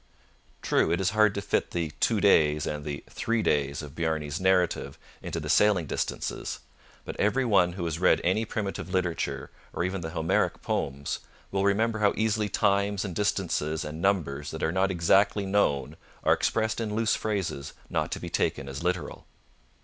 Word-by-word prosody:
True, - - +2
it 85 - +1
is 95 -1 +1
hard 105 -1 +4
to 100 - -3
fit 100 - 0
the 85 -3 -2
'two 110 -3 +2
days' 75 -7 +4
and 75 -1 -3
the 70 -1 -5
'three 115 -1 -1
days' 70 +1 0
of 70 -2 -9
Bjarne's 80 -1 -2
narrative 90 -7 +1 0.2
into - - -4
the - - -6
sailing 105 -5 +4
distances. - - -3 0.5
But - - -7
every 125 +6 +2
one 95 -6 +3
who 90 -2 -4
has 80 -1 -2
read 90 - +4
any 95 +6 +2
primitive 105 -4 -4
literature, 90 -3 -2 0.2
or - - -1
even 90 +1 -2
the 80 - -4
Homeric 80 0 0
poems, 70 +1 -2 0.3
will 95 0 0
remember 110 +3 +2
how 105 -1 +3
easily 110 -1 +1
times 100 0 +1
and 90 -4 -5
distances 85 -7 0
and 75 +2 -6
numbers 75 -7 0
that 80 - -5
are 80 - +2
not 95 +2 +2
exactly 95 +3 +3
known 85 -9 +1 0.3
are - - +5
expressed 110 0 0
in 105 -2 -2
loose 115 0 +2
phrases 95 -10 -2
not - - -1
to - - -4
be - - -7
taken 70 - 0
as 70 +1 -6
literal. 90 0 -3
95 Hz, 180 wpm, -27 LUFS, 80-105 Hz, 0.5 s, are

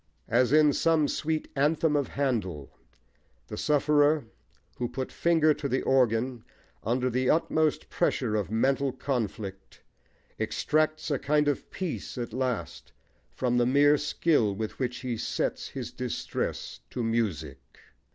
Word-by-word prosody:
As 120 +2 +3
in 150 -1 +5
some 160 -1 +3
sweet 155 +1 -2
anthem 150 +2 +2
of 145 -2 +1
Handel, 105 - -2 0.8
the - - -5
sufferer, 150 -1 +3 0.5
who 120 -1 -2
put 130 +1 -4
finger 160 -2 +3
to 140 -1 -4
the 130 - 0
organ 125 -2 +2 0.4
under 125 +3 0
the 130 +1 0
utmost 155 -1 +1
pressure 115 -5 0
of 105 -3 -1
mental 135 +5 +1
conflict, 115 -7 -4 0.6
extracts 155 0 0
a 140 - +1
kind 150 0 +2
of 145 - -1
peace 180 -7 -5
at 120 -2 -4
last 125 -2 -3 0.4
from 125 -1 -1
the 120 - +3
mere 145 +3 +5
skill 115 -12 +1
with 110 +1 -5
which 125 -2 -2
he 125 -3 -3
sets - - -2
his - - -6
distress - - -4
to 125 - -3
music. 95 - -1
130 Hz, 135 wpm, -28 LUFS, 115-150 Hz, 0.8 s, in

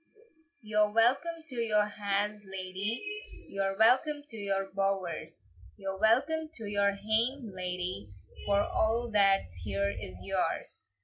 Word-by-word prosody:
"You're 210 -1 +2
welcome 275 +9 +2
to 260 - -7
your 215 -3 +3
ha's, 210 0 -2
ladye, 200 - -5
You're 195 0 -1
welcome 280 +7 +4
to 225 - -8
your 195 -2 -1
bowers; 180 - -2 0.3
Your 195 -1 -4
welcome 280 +9 +3
to 225 - -5
your 200 -1 +2
hame, 220 +4 0
ladye, 180 - -4 0.4
For 200 0 +4
a' 230 +3 0
that's 195 - +3
here 100 +2 -1
is 95 -1 -7
yours." - - -2
205 Hz, 125 wpm, -30 LUFS, 195-230 Hz, 0.4 s, welcome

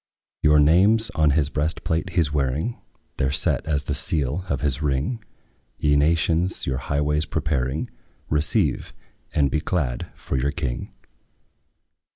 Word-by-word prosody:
Your 75 0 +5
names 100 +9 +4
on 80 -3 +2
his 70 -3 +2
breastplate 80 +3 -1
he 90 - +3
's 75 -1 -3
wearing; 75 - -1 0.4
They - - +1
're - - +1
set 70 - +2
as 75 -2 +1
the - - -3
seal 75 +4 0
of 70 - -1
his 75 -1 0
ring; 75 - -1 0.5
Ye 75 -2 +2
nations, 80 +4 +1
your 65 -1 -2
highways 75 +2 0
preparing, 70 -2 -2 0.4
Receive, 75 - +1 0.4
and 70 -2 +1
be 75 - +1
glad 75 -6 -2 0.2
in 65 - +2
your 70 +3 0
King! 65 -7 -4
75 Hz, 145 wpm, -23 LUFS, 70-80 Hz, 0.5 s, Your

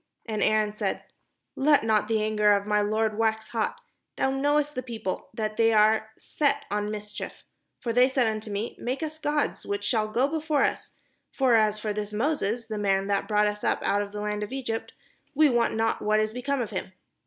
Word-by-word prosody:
And 215 -2 -3
Aaron 215 -1 +2
said: - - -2 0.5
"Let 290 -1 +4
not 215 -1 +2
the 220 -1 +1
anger 210 -1 +3
of 200 0 0
my 210 0 +2
lord 215 +1 0
wax 220 -1 0
hot. 240 - -2 0.4
Thou 265 - +1
knowest 290 +2 +1
the 255 - -3
people, 230 -6 -5
that 215 -2 -3
they 225 0 +4
are 215 0 +4
set 290 -2 0
on 210 0 -1
mis 210 0 -6
chief. - - -7 0.4
For 235 - -2
they 250 +2 +5
said 260 -2 +2
unto 215 -1 -2
me, 205 +3 -3
' - - -23
Make 260 +6 -2
us 310 0 -5
gods, 295 -1 -1
which 200 0 -3
shall 215 0 +1
go 240 +5 +1
before 310 -1 0
us; - - -2 0.4
for 260 -3 +2
as 215 -2 +4
for 210 0 -3
this 210 0 -4
Moses, 235 -2 -1
the 215 -2 -4
man 195 -1 +1
that 200 - 0
brought 210 -1 +3
us 210 0 -2
up - - 0
out 205 - +2
of 200 -1 -5
the 210 0 -5
land 210 0 -2
of 210 - -4
Egypt, 250 -4 -4 0.4
we 305 +1 +5
wot 240 -2 +2
not 225 0 0
what 215 0 +2
is 215 0 0
be 250 - -5
come 280 0 0
of 225 - -4
him.' 190 -1 -5
220 Hz, 220 wpm, -27 LUFS, 210-255 Hz, 0.5 s, they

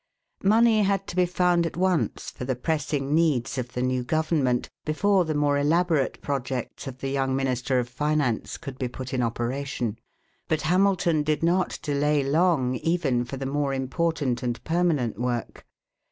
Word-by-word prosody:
Money 220 +2 +5
had 195 -1 +1
to - - -7
be 180 -1 +3
found 180 -1 +2
at 165 - -4
once 185 -2 0
for - - -8
the 130 0 -1
pressing 145 0 -1
needs 140 -6 +1
of 125 0 -5
the 125 - -1
new 130 0 0
government 150 -3 +1 0.2
before 190 +4 +2
the 155 -1 -2
more 145 -1 +2
elaborate 160 -1 +1
projects 135 -2 -3
of 130 -1 -6
the 135 - -2
young 135 -1 0
minister 130 -1 0
of 125 -1 0
finance 145 -2 -1
could 135 -5 -8
be 130 - -1
put 130 +2 -7
in 130 - +1
operation. 120 0 -2 0.5
But 155 -1 0
Hamilton 180 -2 +2
did 155 +1 -1
not 180 +2 +1
delay 145 0 +1
long 140 -3 +2
even 140 -6 0
for 135 +3 -6
the 135 - -4
more 140 0 -1
important 135 -1 -1
and 120 -2 -3
permanent 160 - 0
work. 120 -1 -3
145 Hz, 170 wpm, -26 LUFS, 130-170 Hz, 0.5 s, Money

